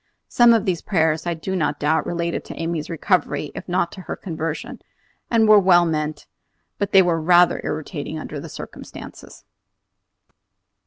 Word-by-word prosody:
Some 240 Hz, -1 st, +5 dB
of 220 Hz, -2 st, 0 dB
these 180 Hz, -4 st, -1 dB
prayers, 160 Hz, -3 st, 0 dB
I 170 Hz, -, -1 dB
do 190 Hz, +4 st, -4 dB
not 150 Hz, -4 st, -1 dB
doubt, 155 Hz, +2 st, +1 dB
related 170 Hz, 0 st, -2 dB
to -, -, -9 dB
Amy's 165 Hz, -2 st, -3 dB
recovery 170 Hz, -2 st, 0 dB
if -, -, -9 dB
not 175 Hz, -1 st, 0 dB
to 190 Hz, -, -10 dB
her -, -, -6 dB
conversion, 160 Hz, -3 st, -5 dB, 0.5 s
and 225 Hz, -2 st, +3 dB
were 215 Hz, -1 st, +8 dB
well 180 Hz, -2 st, +5 dB
meant; 155 Hz, -2 st, -3 dB, 0.5 s
but 200 Hz, -1 st, -1 dB
they 190 Hz, -1 st, +7 dB
were 170 Hz, -2 st, 0 dB
rather 175 Hz, +2 st, +4 dB
irritating 155 Hz, 0 st, -5 dB
under 155 Hz, -1 st, -6 dB
the 160 Hz, +3 st, -9 dB
circumstances! -, -, -11 dB
170 Hz, 160 wpm, -21 LUFS, 155-185 Hz, 0.5 s, were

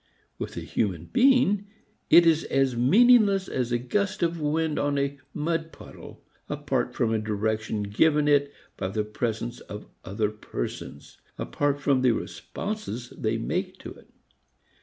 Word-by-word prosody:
With -, -, -5 dB
a -, -, -3 dB
human 85 Hz, -6 st, -2 dB
being 245 Hz, -6 st, +4 dB, 0.4 s
it 170 Hz, -, +8 dB
is 160 Hz, -1 st, +4 dB
as 135 Hz, -2 st, +1 dB
meaningless 200 Hz, -, +5 dB
as 125 Hz, -2 st, -2 dB
a 120 Hz, -, +2 dB
gust 200 Hz, -, -1 dB
of 170 Hz, -1 st, 0 dB
wind 155 Hz, +1 st, 0 dB
on 145 Hz, 0 st, 0 dB
a 140 Hz, 0 st, -1 dB
mud 165 Hz, +1 st, -2 dB
puddle -, -, -13 dB, 0.3 s
apart -, -, -2 dB
from 115 Hz, -1 st, +1 dB
a 110 Hz, -, +1 dB
direction 110 Hz, 0 st, -2 dB
given 145 Hz, +9 st, +2 dB
it 145 Hz, -1 st, +3 dB, 0.3 s
by 95 Hz, -, -2 dB
the 105 Hz, +3 st, -1 dB
presence 115 Hz, +2 st, -3 dB
of 105 Hz, 0 st, -9 dB, 0.2 s
other 105 Hz, +2 st, -1 dB
persons, 70 Hz, -, -7 dB, 0.2 s
apart 145 Hz, -1 st, -1 dB
from 140 Hz, -2 st, +2 dB
the 125 Hz, -2 st, +4 dB
responses 160 Hz, -, -5 dB
they 110 Hz, +1 st, -1 dB
make 185 Hz, -, -3 dB
to -, -, -9 dB
it. -, -, -19 dB
140 Hz, 150 wpm, -26 LUFS, 110-170 Hz, 0.4 s, it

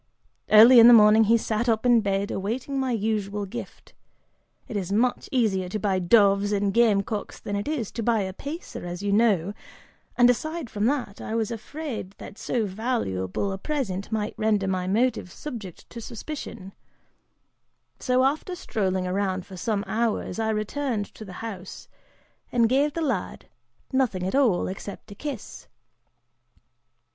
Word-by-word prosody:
Early 230 Hz, +4 st, +9 dB
in 230 Hz, -, +10 dB
the 240 Hz, -, +10 dB
morning, 215 Hz, 0 st, +7 dB
he 230 Hz, +2 st, +5 dB
sat 225 Hz, +1 st, -1 dB
up 225 Hz, +1 st, +1 dB
in 240 Hz, -2 st, +5 dB
bed, 200 Hz, -1 st, -1 dB
awaiting 245 Hz, +8 st, -3 dB
my 260 Hz, -1 st, 0 dB
usual 210 Hz, -2 st, -1 dB
gift. 190 Hz, -, -9 dB, 0.7 s
It -, -, -7 dB
is 195 Hz, -2 st, -3 dB
much 240 Hz, +5 st, +1 dB
easier 205 Hz, -8 st, +1 dB
to 215 Hz, -, -2 dB
buy 195 Hz, -2 st, 0 dB
doves 200 Hz, +1 st, +4 dB
and 200 Hz, -1 st, 0 dB
game 215 Hz, -4 st, +4 dB
cocks 210 Hz, 0 st, -5 dB
than 205 Hz, -, -4 dB
it 200 Hz, +4 st, -3 dB
is 285 Hz, -9 st, -2 dB
to 230 Hz, -, -4 dB
buy 225 Hz, -1 st, +2 dB
a 190 Hz, -1 st, -4 dB
pacer, 290 Hz, -, -7 dB
as 175 Hz, +2 st, -6 dB
you 205 Hz, -, 0 dB
know, 200 Hz, -4 st, +2 dB, 0.6 s
and 245 Hz, -, +7 dB
aside 310 Hz, +2 st, -1 dB
from 205 Hz, 0 st, -1 dB
that, 255 Hz, -7 st, -2 dB
I 220 Hz, -, -4 dB
was 225 Hz, -1 st, -1 dB
also 225 Hz, -2 st, -5 dB
afraid 265 Hz, -10 st, -6 dB
that 195 Hz, -, -11 dB
so 235 Hz, -3 st, -1 dB
valuable 195 Hz, -, -2 dB
a 195 Hz, -, -5 dB
present 210 Hz, -9 st, -3 dB
might 215 Hz, -1 st, -2 dB
render 210 Hz, -3 st, +1 dB
my 185 Hz, -1 st, -1 dB
motive 225 Hz, -2 st, 0 dB
subject 215 Hz, -, -8 dB
to 235 Hz, -, -7 dB
suspicion, 230 Hz, -5 st, -7 dB, 1.3 s
so, 255 Hz, 0 st, +2 dB
after 305 Hz, +7 st, 0 dB
strolling 190 Hz, -, -2 dB
around 185 Hz, 0 st, -1 dB
for 190 Hz, -, -11 dB
some 205 Hz, +2 st, -1 dB
hours, 225 Hz, 0 st, -1 dB
I 220 Hz, 0 st, 0 dB
returned 215 Hz, 0 st, -2 dB
to -, -, -10 dB
the 190 Hz, -3 st, -10 dB
house, 190 Hz, -4 st, -8 dB, 0.6 s
and 235 Hz, -2 st, +3 dB
gave 275 Hz, +4 st, +2 dB
the 335 Hz, -, -3 dB
lad 260 Hz, -, -2 dB, 0.5 s
nothing 245 Hz, -9 st, +1 dB
at 185 Hz, -, -2 dB
all 255 Hz, -10 st, +3 dB
except 195 Hz, +2 st, -8 dB
a -, -, -6 dB
kiss. 270 Hz, 0 st, -7 dB
215 Hz, 165 wpm, -25 LUFS, 195-245 Hz, 1.3 s, in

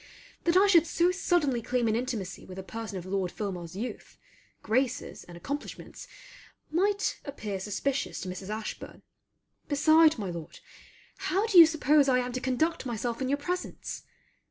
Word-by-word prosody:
That 340 Hz, +1 st, +4 dB
I 390 Hz, -, +7 dB
should 340 Hz, -5 st, +5 dB
so 345 Hz, +1 st, +2 dB
suddenly 335 Hz, -9 st, +1 dB
claim 245 Hz, 0 st, 0 dB
an 220 Hz, -, +2 dB
intimacy 225 Hz, -7 st, -3 dB
with 185 Hz, -, -10 dB
a 190 Hz, -, -5 dB
person 220 Hz, 0 st, -6 dB
of 180 Hz, -, -7 dB
Lord 185 Hz, -1 st, -1 dB
Filmar's 180 Hz, -5 st, -5 dB
youth, 230 Hz, +6 st, -6 dB, 0.5 s
graces, 255 Hz, +4 st, -1 dB
and 175 Hz, -1 st, -11 dB
accomplishments 285 Hz, +12 st, -6 dB, 0.6 s
might 400 Hz, +5 st, +1 dB
appear 210 Hz, -9 st, -5 dB
suspicious 255 Hz, +8 st, -2 dB
to -, -, -5 dB
Mrs. 185 Hz, +2 st, -7 dB
Ashburn; 215 Hz, 0 st, -6 dB, 0.6 s
beside, 310 Hz, +2 st, +5 dB
my 200 Hz, -5 st, -3 dB
Lord, 170 Hz, -2 st, -8 dB, 0.6 s
how 390 Hz, +4 st, 0 dB
do 405 Hz, -6 st, +6 dB
you 330 Hz, -, +11 dB
suppose 300 Hz, -2 st, +3 dB
I 255 Hz, -, +4 dB
am 250 Hz, 0 st, -1 dB
to 255 Hz, +1 st, -4 dB
conduct 290 Hz, +6 st, 0 dB
myself 235 Hz, 0 st, -3 dB
in 260 Hz, -, -1 dB
your 285 Hz, -, +2 dB
presence? 360 Hz, +5 st, -4 dB
255 Hz, 160 wpm, -29 LUFS, 205-315 Hz, 0.6 s, you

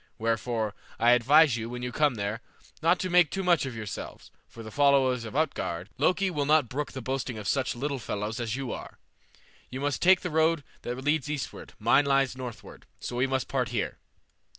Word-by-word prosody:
Wherefore, 115 Hz, -1 st, -1 dB, 0.2 s
I 120 Hz, +1 st, +4 dB
advise 135 Hz, +3 st, +5 dB
you, 115 Hz, 0 st, -4 dB
when 125 Hz, 0 st, -6 dB
you 125 Hz, -, -3 dB
come 145 Hz, -1 st, +2 dB
there, 105 Hz, +2 st, -3 dB, 0.4 s
not 170 Hz, +3 st, +4 dB
to 185 Hz, -, -2 dB
make 175 Hz, -3 st, +5 dB
too 195 Hz, +6 st, -3 dB
much 175 Hz, -6 st, +3 dB
of 125 Hz, -, -6 dB
yourselves, 105 Hz, -5 st, -7 dB, 0.2 s
for 115 Hz, -, -11 dB
the 110 Hz, -, -9 dB
followers 135 Hz, -3 st, +3 dB
of 110 Hz, -, -8 dB
Utgard 100 Hz, -, -2 dB
Loki 185 Hz, +6 st, +2 dB
will 145 Hz, -4 st, -1 dB
not 150 Hz, -4 st, +4 dB
brook 145 Hz, +3 st, -4 dB
the 130 Hz, -, -6 dB
boasting 130 Hz, -2 st, -3 dB
of 105 Hz, -, -6 dB
such 135 Hz, -3 st, 0 dB
little 140 Hz, +2 st, -2 dB
fellows 105 Hz, +1 st, -4 dB
as 115 Hz, -1 st, -2 dB
you 135 Hz, -2 st, -4 dB
are. -, -, -8 dB, 0.7 s
You 130 Hz, -, -6 dB
must 145 Hz, -2 st, -1 dB
take 185 Hz, +1 st, +6 dB
the 180 Hz, -, -4 dB
road 160 Hz, 0 st, +2 dB, 0.2 s
that 120 Hz, -, -4 dB
leads 150 Hz, 0 st, +1 dB
eastward, 150 Hz, -2 st, -5 dB
mine 120 Hz, +6 st, +4 dB
lies 135 Hz, -2 st, +2 dB
northward, 120 Hz, -5 st, -9 dB
so 120 Hz, -, -5 dB
we 125 Hz, +2 st, +2 dB
must 130 Hz, -1 st, -1 dB
part -, -, -1 dB
here." -, -, -3 dB
130 Hz, 200 wpm, -28 LUFS, 115-150 Hz, 0.7 s, take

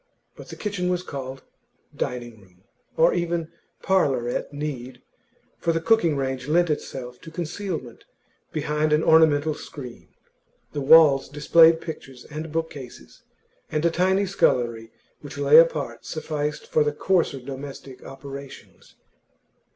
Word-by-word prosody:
But -, -, -12 dB
the -, -, -8 dB
kitchen 195 Hz, -4 st, -2 dB
was 180 Hz, 0 st, -1 dB
called 135 Hz, -5 st, -7 dB, 0.5 s
dining 120 Hz, -3 st, -5 dB
room, 90 Hz, -1 st, -24 dB, 0.3 s
or -, -, +5 dB
even 170 Hz, -2 st, -2 dB, 0.3 s
parlour 145 Hz, -11 st, +2 dB
at 120 Hz, -, -3 dB
need; 130 Hz, -4 st, -6 dB, 0.6 s
for 170 Hz, -, +1 dB
the 165 Hz, -, 0 dB
cooking 170 Hz, -5 st, +2 dB
range 130 Hz, -1 st, -3 dB
lent 170 Hz, +2 st, +3 dB
itself 125 Hz, -4 st, -5 dB
to 165 Hz, -, -10 dB
concealment 165 Hz, -, -5 dB, 0.5 s
behind 150 Hz, 0 st, 0 dB
an 155 Hz, +1 st, +3 dB
ornamental 155 Hz, -1 st, +4 dB
screen, 130 Hz, -5 st, -10 dB, 0.7 s
the 145 Hz, -, -3 dB
walls 140 Hz, -2 st, +6 dB
displayed 160 Hz, +3 st, +5 dB
pictures 135 Hz, -6 st, -9 dB
and 155 Hz, +1 st, -6 dB
bookcases, 150 Hz, -6 st, -6 dB, 0.5 s
and 155 Hz, +1 st, -1 dB
a 170 Hz, -, +3 dB
tiny 190 Hz, +4 st, +2 dB
scullery 120 Hz, -11 st, 0 dB, 0.3 s
which 145 Hz, +1 st, -10 dB
lay 145 Hz, +2 st, +6 dB
apart 145 Hz, -8 st, +1 dB
sufficed 150 Hz, -1 st, -4 dB
for 155 Hz, -, +2 dB
the 150 Hz, 0 st, -1 dB
coarser 170 Hz, -4 st, +1 dB
domestic 135 Hz, 0 st, -9 dB
operations. 140 Hz, 0 st, -11 dB
150 Hz, 130 wpm, -24 LUFS, 135-165 Hz, 0.7 s, walls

